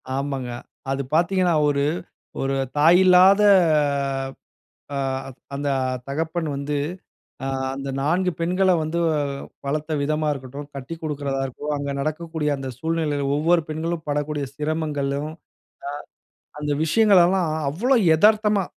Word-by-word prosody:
ஆமாங்க. 135 Hz, -2 st, -3 dB, 0.4 s
அது 135 Hz, 0 st, -1 dB
பார்த்தீங்கன்னா 180 Hz, +1 st, +2 dB
ஒரு, 140 Hz, -1 st, +1 dB, 0.6 s
ஒரு 135 Hz, 0 st, 0 dB, 0.2 s
தாய் 165 Hz, +5 st, +6 dB
இல்லாத 185 Hz, +3 st, +7 dB, 1.5 s
அ -, -, -2 dB, 0.6 s
அந்த 145 Hz, +1 st, -2 dB, 0.4 s
தகப்பன் 160 Hz, +3 st, -2 dB
வந்து 145 Hz, +1 st, -3 dB, 0.7 s
ஆ -, -, -1 dB, 0.3 s
அந்த 135 Hz, 0 st, -5 dB
4 180 Hz, +6 st, +1 dB
பெண்கள 185 Hz, +3 st, +2 dB
வந்து 155 Hz, +2 st, -3 dB, 0.7 s
வளர்த்த 155 Hz, +2 st, -2 dB
விதமா 155 Hz, +2 st, 0 dB
இருக்கட்டும். 140 Hz, +1 st, -8 dB
கட்டிக்குடுக்கறதா 145 Hz, -1 st, -4 dB
இருக்கட்டும். 145 Hz, +3 st, -4 dB
அங்க 140 Hz, 0 st, -3 dB
நடக்கக்கூடிய 155 Hz, +1 st, -2 dB
அந்த 135 Hz, -1 st, -5 dB
சூழ்நிலையில 160 Hz, -3 st, -1 dB
ஒவ்வொரு 165 Hz, +3 st, +3 dB
பெண்களும் 160 Hz, +1 st, -3 dB
படக்கூடிய 145 Hz, 0 st, -1 dB
சிரமங்களும். 150 Hz, -1 st, -2 dB
அ. 160 Hz, -, -16 dB, 1.2 s
அந்த 150 Hz, -1 st, -1 dB
விஷயங்கள் 200 Hz, +3 st, +5 dB
எல்லாம் 180 Hz, -1 st, +1 dB, 0.2 s
அவ்ளோ 235 Hz, -, +1 dB, 0.2 s
எதார்த்தமா, 210 Hz, +2 st, +4 dB
155 Hz, 110 wpm, -23 LUFS, 140-170 Hz, 1.5 s, இல்லாத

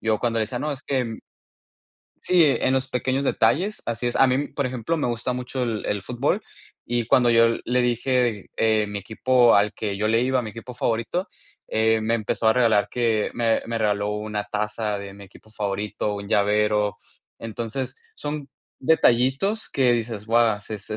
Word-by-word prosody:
yo, 110 Hz, -1 st, +1 dB
cuando 115 Hz, 0 st, 0 dB
le 110 Hz, -, +2 dB
decía: 120 Hz, +3 st, -5 dB
"No, 150 Hz, +3 st, -2 dB
es 140 Hz, -1 st, -8 dB
que". 125 Hz, -5 st, -2 dB, 1.1 s
Sí, 180 Hz, -1 st, +4 dB
en 135 Hz, -2 st, +2 dB
los 130 Hz, 0 st, +1 dB
pequeños 130 Hz, +2 st, -1 dB
detalles 195 Hz, +9 st, +1 dB
Así 120 Hz, +1 st, -2 dB
es. 120 Hz, -, -3 dB
A 135 Hz, -, +5 dB
mí, 130 Hz, +3 st, 0 dB
por 140 Hz, -, -3 dB
ejemplo, 125 Hz, +5 st, -2 dB
me 150 Hz, -, -1 dB
gusta 120 Hz, +1 st, -2 dB
mucho 125 Hz, +1 st, -3 dB
el 115 Hz, -3 st, -3 dB
el 105 Hz, -1 st, -1 dB
fútbol 125 Hz, -, -1 dB, 0.4 s
y, 120 Hz, -1 st, -1 dB
cuando 120 Hz, 0 st, +4 dB
yo 115 Hz, 0 st, +6 dB, 0.2 s
le 125 Hz, +1 st, +2 dB
dije, 120 Hz, -3 st, 0 dB
eh, 110 Hz, -1 st, +2 dB
mi 100 Hz, 0 st, -4 dB
equipo 120 Hz, +4 st, +3 dB
al 100 Hz, +1 st, +3 dB
que 100 Hz, -2 st, -3 dB
yo 105 Hz, +1 st, 0 dB
le 115 Hz, +1 st, +3 dB
iba, 130 Hz, 0 st, +1 dB
mi 110 Hz, -, -6 dB
equipo 120 Hz, +3 st, -9 dB
favorito, 120 Hz, -, -1 dB, 0.4 s
eh, 110 Hz, 0 st, +2 dB
me 110 Hz, +1 st, 0 dB
empezó 110 Hz, 0 st, -1 dB
a 110 Hz, -, +6 dB
regalar 115 Hz, -4 st, +3 dB
que 115 Hz, -3 st, 0 dB
me 115 Hz, -2 st, +1 dB
me 115 Hz, -, -2 dB
regaló 105 Hz, -2 st, 0 dB
una 105 Hz, 0 st, -3 dB
taza 105 Hz, 0 st, -2 dB
de 100 Hz, -1 st, -8 dB
mi 100 Hz, 0 st, -12 dB
equipo 100 Hz, +3 st, -19 dB
favorito, 105 Hz, 0 st, -2 dB
un 100 Hz, 0 st, -7 dB
llavero. 105 Hz, 0 st, +2 dB, 0.4 s
Entonces, 115 Hz, +3 st, -4 dB, 0.2 s
son 145 Hz, -1 st, -5 dB, 0.3 s
detallitos 135 Hz, -, +2 dB
que 130 Hz, -3 st, +2 dB
dices: 115 Hz, -3 st, -2 dB
"Buah, 115 Hz, -2 st, +2 dB
se 110 Hz, -, -6 dB
es 100 Hz, -, -10 dB
115 Hz, 185 wpm, -24 LUFS, 105-125 Hz, 1.1 s, yo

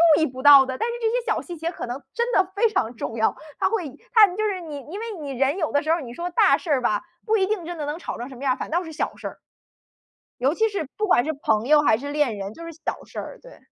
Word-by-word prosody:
注 315 Hz, -, +1 dB
意 315 Hz, -, +3 dB
不 260 Hz, 0 st, -8 dB
到 285 Hz, -2 st, +10 dB
的， 260 Hz, 0 st, -4 dB
但 -, -, -1 dB
是 -, -, -3 dB
这 450 Hz, -, +2 dB
些 485 Hz, +1 st, 0 dB
小 -, -, 0 dB
细 345 Hz, -2 st, -8 dB
节 330 Hz, +2 st, -3 dB
可 -, -, -6 dB
能 245 Hz, +3 st, -4 dB
真 475 Hz, +1 st, 0 dB
的 380 Hz, -4 st, +4 dB
非 450 Hz, +3 st, +3 dB
常 240 Hz, -, -1 dB
重 225 Hz, -, -5 dB
要。 220 Hz, -, +2 dB, 0.2 s
他 -, -, +2 dB
会 425 Hz, -7 st, -1 dB, 0.3 s
他 435 Hz, -3 st, +8 dB
就 390 Hz, +4 st, -3 dB
是 390 Hz, -3 st, -1 dB
你 305 Hz, -4 st, -7 dB
因 400 Hz, -, -5 dB
为 455 Hz, -, -4 dB
你 285 Hz, -3 st, -5 dB
人 270 Hz, +5 st, +1 dB
有 315 Hz, -5 st, -1 dB
的 285 Hz, -, +2 dB
时 310 Hz, +2 st, 0 dB
候 335 Hz, -, +2 dB
你 240 Hz, -3 st, -8 dB
说 345 Hz, +6 st, -4 dB
大 350 Hz, -, +5 dB
事 340 Hz, -, -9 dB
儿 275 Hz, -3 st, +3 dB
吧， 210 Hz, -4 st, +1 dB, 0.2 s
不 440 Hz, 0 st, +2 dB
一 380 Hz, -2 st, +2 dB
定 415 Hz, -5 st, -2 dB
真 345 Hz, 0 st, -6 dB
的 295 Hz, -, -2 dB
能 295 Hz, +2 st, -3 dB
吵 345 Hz, -, -6 dB
成 245 Hz, -, -6 dB
什 265 Hz, -, -10 dB
么 255 Hz, -, -10 dB
样， 260 Hz, -2 st, +2 dB
反 -, -, -5 dB
倒 345 Hz, +3 st, 0 dB
是 325 Hz, -, -8 dB
小 305 Hz, -, -2 dB
事 -, -, -6 dB
儿。 -, -, -10 dB, 1.0 s
尤 270 Hz, +5 st, +2 dB
其 445 Hz, +4 st, +2 dB
是 395 Hz, -10 st, -4 dB
不 425 Hz, -, 0 dB
管 245 Hz, -, +4 dB
是 315 Hz, -, -1 dB
朋 225 Hz, -6 st, 0 dB
友 300 Hz, +1 st, +6 dB
还 250 Hz, -, +4 dB
是 285 Hz, +3 st, -5 dB
恋 290 Hz, -8 st, +1 dB
人， 200 Hz, +1 st, -6 dB
就 335 Hz, -, -10 dB
是 335 Hz, -, -7 dB
小 325 Hz, -, -5 dB
事 -, -, -10 dB
儿， -, -, -6 dB
对。 -, -, -14 dB
315 Hz, 330 characters per minute, -24 LUFS, 265-380 Hz, 1.0 s, 到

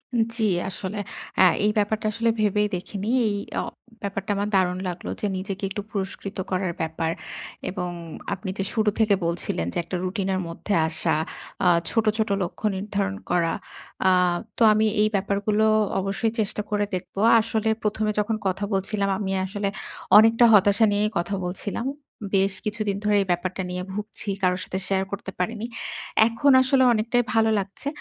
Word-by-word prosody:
জ্বী, 230 Hz, 0 st, +1 dB, 0.2 s
আসলে। 195 Hz, +2 st, -5 dB, 0.4 s
অ্যা -, -, +7 dB, 0.2 s
এই 210 Hz, -, +4 dB
ব্যাপারটা 210 Hz, +1 st, 0 dB
আসলে 230 Hz, +2 st, 0 dB
ভেবেই 210 Hz, 0 st, +2 dB
দেখিনি। 200 Hz, +3 st, -5 dB, 0.2 s
এই 205 Hz, -, 0 dB, 0.2 s
অ -, -, +1 dB, 0.4 s
ব্যাপারটা 200 Hz, 0 st, -3 dB
আমার 205 Hz, +1 st, -1 dB
দারুণ 180 Hz, -1 st, +2 dB
লাগলো 175 Hz, 0 st, -6 dB
যে, -, -, -2 dB
নিজেকে 195 Hz, +1 st, -5 dB
একটু 200 Hz, +1 st, -4 dB
পুরস্কৃত 195 Hz, -1 st, -4 dB
করার 185 Hz, -2 st, 0 dB
ব্যাপার। 160 Hz, 0 st, -1 dB, 0.6 s
এবং 180 Hz, -1 st, -3 dB, 0.4 s
আপনি 185 Hz, 0 st, -5 dB
যে 195 Hz, -, 0 dB
শুরু 215 Hz, -2 st, +2 dB
থেকে 210 Hz, -2 st, +4 dB
বলছিলেন 170 Hz, -, -1 dB
যে, -, -, -3 dB
একটা 180 Hz, -, -5 dB
রুটিন 190 Hz, +1 st, -2 dB
এর -, -, -1 dB
মধ্যে 170 Hz, +4 st, -4 dB
আসা, 160 Hz, 0 st, +1 dB, 0.5 s
আ -, -, +6 dB, 0.2 s
ছোট, 225 Hz, -1 st, +1 dB
ছোট 220 Hz, -1 st, 0 dB
লক্ষ্য 175 Hz, +4 st, -6 dB
নির্ধারণ 200 Hz, 0 st, -2 dB, 0.2 s
করা। 170 Hz, -2 st, +2 dB, 0.5 s
আ 185 Hz, -, +6 dB, 0.5 s
তো, -, -, -7 dB
আমি 215 Hz, +1 st, +3 dB, 0.2 s
এই 215 Hz, -, +5 dB
ব্যাপারগুলো 200 Hz, +2 st, +1 dB, 0.3 s
অবশ্যই 195 Hz, +3 st, -1 dB
চেষ্টা 210 Hz, 0 st, 0 dB
করে 205 Hz, -1 st, +1 dB
দেখব। 180 Hz, -, -7 dB, 0.3 s
আসলে 220 Hz, 0 st, -1 dB
প্রথমে 215 Hz, 0 st, 0 dB
যখন 215 Hz, +1 st, 0 dB
কথা 190 Hz, +2 st, -1 dB
বলছিলাম 200 Hz, +1 st, 0 dB
আমি 195 Hz, -2 st, -2 dB
আসলে, 200 Hz, +1 st, -3 dB, 0.5 s
অনেকটা 225 Hz, +2 st, +7 dB
হতাশা 205 Hz, +2 st, +6 dB
নিয়েই 210 Hz, +1 st, +1 dB
কথা 185 Hz, +4 st, -1 dB
বলছিলাম। 200 Hz, +7 st, -3 dB, 0.5 s
বেশ 195 Hz, 0 st, +3 dB
কিছুদিন 210 Hz, -2 st, -1 dB
ধরে, 210 Hz, 0 st, +3 dB
এই 195 Hz, -, -3 dB
ব্যাপারটা 185 Hz, +2 st, -1 dB
নিয়ে 180 Hz, 0 st, -3 dB
ভুগছি। 210 Hz, +1 st, -5 dB
কারো 180 Hz, -1 st, +2 dB
সাথে 190 Hz, -, -4 dB
শেয়ার 190 Hz, -1 st, +1 dB
করতে 200 Hz, -1 st, -5 dB
পারিনি। 220 Hz, +4 st, -2 dB, 0.6 s
এখন 235 Hz, +5 st, +3 dB
আসলে, 260 Hz, 0 st, +3 dB
অনেকটাই 235 Hz, +2 st, +1 dB
ভালো 225 Hz, -1 st, +4 dB
লাগছে। 195 Hz, +8 st, -6 dB
200 Hz, 165 wpm, -24 LUFS, 190-215 Hz, 0.6 s, অ্যা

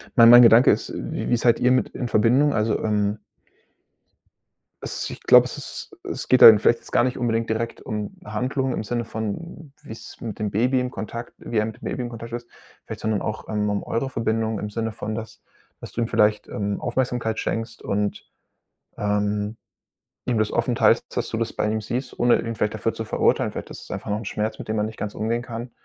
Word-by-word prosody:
mein 115 Hz, -2 st, +8 dB
mein 120 Hz, +1 st, +10 dB
Gedanke 115 Hz, +1 st, +7 dB
ist: -, -, -2 dB
Wie -, -, -4 dB
wie 120 Hz, -, +3 dB
seid 120 Hz, 0 st, +3 dB
ihr 125 Hz, -, +3 dB
mit 130 Hz, -, +2 dB
in 125 Hz, -, -4 dB
Verbindung? 125 Hz, +7 st, +3 dB
Also, 110 Hz, 0 st, +1 dB
ähm 105 Hz, -1 st, 0 dB, 1.6 s
Es -, -, -4 dB
ich -, -, -9 dB
glaube, -, -, +7 dB
es -, -, -6 dB
ist -, -, -8 dB
es -, -, -5 dB
geht 130 Hz, -, +4 dB
da -, -, +14 dB
vielleicht 115 Hz, +2 st, +3 dB
jetzt -, -, -15 dB
gar -, -, +4 dB
nicht 125 Hz, 0 st, -1 dB
unbedingt 115 Hz, -2 st, -1 dB
direkt 115 Hz, +1 st, -2 dB
um 105 Hz, -1 st, -5 dB
Handlung 125 Hz, +5 st, -2 dB
im -, -, -3 dB
Sinne 120 Hz, +2 st, -2 dB
von 135 Hz, -, -6 dB
wie's 110 Hz, -, -11 dB
mit 110 Hz, -3 st, -5 dB
dem 105 Hz, -2 st, -2 dB
Baby 125 Hz, +5 st, +2 dB
in 125 Hz, 0 st, -2 dB
Kontakt 115 Hz, +1 st, -6 dB
wie 115 Hz, -, -4 dB
er 105 Hz, -, +3 dB
mit 110 Hz, -1 st, -7 dB
dem -, -, -9 dB
Baby 130 Hz, -, -3 dB
in 120 Hz, -, -4 dB
Kontakt 115 Hz, 0 st, -8 dB
ist 120 Hz, 0 st, -5 dB, 0.4 s
vielleicht, -, -, -7 dB
sondern 110 Hz, -2 st, 0 dB
auch, 105 Hz, -, -4 dB
ähm, 105 Hz, -1 st, 0 dB
um 100 Hz, -1 st, -1 dB
eure 135 Hz, +3 st, -2 dB
Verbindung 110 Hz, -2 st, -1 dB
im 105 Hz, -, -4 dB
Sinne 115 Hz, +1 st, -3 dB
von, 110 Hz, 0 st, -5 dB
dass 110 Hz, 0 st, -8 dB, 0.4 s
dass -, -, -9 dB
du 120 Hz, -, -3 dB
ihm 115 Hz, -, 0 dB
vielleicht, 105 Hz, -1 st, +2 dB
ähm, 100 Hz, -1 st, -3 dB
Aufmerksamkeit 120 Hz, -3 st, -1 dB
schenkst 115 Hz, 0 st, -3 dB
und, 100 Hz, 0 st, -2 dB, 0.7 s
ähm, 105 Hz, +1 st, -1 dB, 0.7 s
ihm 120 Hz, -3 st, 0 dB
das 110 Hz, -, +1 dB
offen -, -, 0 dB
teilst, -, -, +4 dB
dass -, -, -1 dB
du 110 Hz, -, -3 dB
das 115 Hz, 0 st, -2 dB
bei 105 Hz, -, -1 dB
ihm 110 Hz, 0 st, -1 dB
siehst, 125 Hz, +5 st, -4 dB
ohne 120 Hz, 0 st, +4 dB
ihn 115 Hz, -, -4 dB
vielleicht 105 Hz, 0 st, -1 dB
dafür 115 Hz, -, -1 dB
zu 115 Hz, -, -5 dB
verurteilen. -, -, +1 dB
Vielleicht -, -, -7 dB
ist -, -, -9 dB
es -, -, -12 dB
einfach -, -, -5 dB
noch 105 Hz, -, 0 dB
'n 115 Hz, -, -8 dB
Schmerz, 105 Hz, +2 st, -3 dB
mit -, -, -8 dB
dem 110 Hz, 0 st, -1 dB
er 105 Hz, -, +1 dB
nicht 110 Hz, 0 st, -5 dB
ganz 105 Hz, -, -4 dB
umgehen 115 Hz, +2 st, -1 dB
kann, 120 Hz, 0 st, -7 dB
115 Hz, 225 wpm, -23 LUFS, 105-120 Hz, 1.6 s, da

